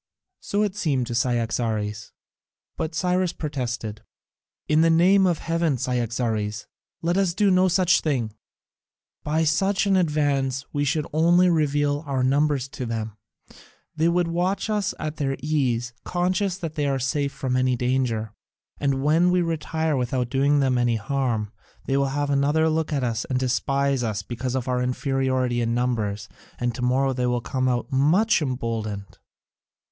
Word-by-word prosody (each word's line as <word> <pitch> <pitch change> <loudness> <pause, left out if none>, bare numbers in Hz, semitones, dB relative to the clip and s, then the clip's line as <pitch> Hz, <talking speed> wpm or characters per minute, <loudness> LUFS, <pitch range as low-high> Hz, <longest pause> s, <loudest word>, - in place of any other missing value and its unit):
So 205 +1 -1
it 205 -2 -2
seemed 145 -11 0
to 120 - -5
Cyaxares, 115 -3 -1 0.6
but 160 0 -4
Cyrus 180 +1 +1
protested: 120 -7 -4 0.7
"In 155 +1 +3
the 165 - +4
name 185 +4 +5
of 175 -3 +1
heaven, 165 -4 0
Cyaxares, 115 -4 -2 0.4
let 175 +2 +1
us 190 -3 +1
do 205 -1 +3
no 185 0 +4
such 185 0 +3
thing. 125 -8 -1 0.9
By 155 +2 +1
such 190 +6 +1
an 195 -1 +3
advance 145 -6 +1
we 145 0 0
should 150 +2 0
only 175 +3 +4
reveal 145 -2 +1
our 135 -2 0
numbers 140 0 +2
to 130 -2 -5
them: 110 -2 -4 0.8
they 160 +2 +2
would 175 0 +1
watch 185 +5 -1
us 210 -2 -1
at 155 0 -4
their 135 -2 -1
ease, 125 -5 -1
conscious 185 +1 0
that 165 -5 -5
they 150 -2 -1
are 135 -1 +1
safe 140 +2 -1
from 130 -2 -2
any 130 0 +2
danger, 125 -4 -1 0.5
and 135 -1 0
when 165 +4 +4
we 180 0 +2
retire 160 -1 -1
without 125 -1 -1
doing 140 +2 +3
them 130 -2 +2
any 120 -1 +2
harm 115 -2 -1 0.3
they 135 - 0
will 140 0 +2
have 145 +1 -1
another 145 +3 +2
look 160 0 -1
at 140 -3 0
us 115 -1 -1
and 130 - -1
despise 135 +1 0
us 110 -3 -2
because 125 +4 -4
of 130 -1 -2
our 125 -1 0
inferiority 130 -1 0
in 115 0 0
numbers, 110 -5 -1 0.3
and 120 -1 -1
to 120 - -6
morrow 130 +2 +2
they 125 -1 -1
will 120 0 +1
come 130 +2 -1
out 125 +3 -2
much 165 +11 +3
emboldened. 115 -7 -4
135 Hz, 160 wpm, -24 LUFS, 125-160 Hz, 0.9 s, name